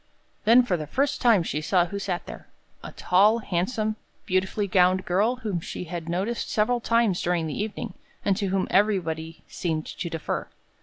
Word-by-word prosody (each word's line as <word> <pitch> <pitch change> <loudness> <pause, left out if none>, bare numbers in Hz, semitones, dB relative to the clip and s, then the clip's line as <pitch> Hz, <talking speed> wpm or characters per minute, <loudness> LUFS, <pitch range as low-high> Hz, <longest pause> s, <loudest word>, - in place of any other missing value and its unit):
Then 235 +3 +7
for 190 -7 0
the 155 -2 -6
first 275 - 0
time 230 -8 +5
she 150 -2 -2
saw 175 +2 +2
who 200 +3 -5
sat 185 -3 -3
there - - -10 0.4
a - - -7
tall, 205 +5 +3
handsome, 215 +2 -1 0.3
beautifully 190 +3 0
gowned 185 0 +3
girl 205 +8 +2
whom 215 -8 -3
she 165 - -6
had 170 -1 -6
noticed 195 +7 -2
several 230 +3 +1
times 230 -5 +2
during 175 -2 0
the 155 +4 -3
evening, 215 -1 -4 0.3
and 200 - +3
to 205 -2 -1
whom 190 0 0
everybody 165 -6 0
seemed 160 -3 -3
to 170 - -5
defer. 165 -2 -3
190 Hz, 175 wpm, -25 LUFS, 175-215 Hz, 0.4 s, Then